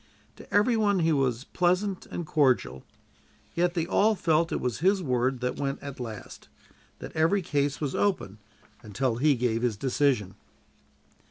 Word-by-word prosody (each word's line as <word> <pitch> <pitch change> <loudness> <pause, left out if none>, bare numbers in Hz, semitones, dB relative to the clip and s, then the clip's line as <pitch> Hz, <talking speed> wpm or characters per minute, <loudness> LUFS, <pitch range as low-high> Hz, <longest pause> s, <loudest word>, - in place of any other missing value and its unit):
To - - -14
every 210 +4 +3
one 205 -3 +2
he 165 0 +2
was 135 -4 0
pleasant 180 +4 0
and 175 - -5
cordial. 130 - +1 0.7
Yet 175 +1 0
they 165 -2 0
all 210 +5 +3
felt 165 -2 +1
it - - -1
was 125 -3 -2
his 190 +3 +2
word 125 -2 0
that 125 0 -2
went 140 -1 -2
at 140 -2 -7
last; 115 -4 -8 0.5
that - - -10
every 165 +5 +2
case 145 -2 -1
was 145 -3 -2
open 175 - -1 0.4
until 115 +3 -2
he 145 +3 +3
gave 115 -2 0
his 120 -4 0
decision. 130 -5 0
145 Hz, 160 wpm, -27 LUFS, 125-175 Hz, 0.7 s, every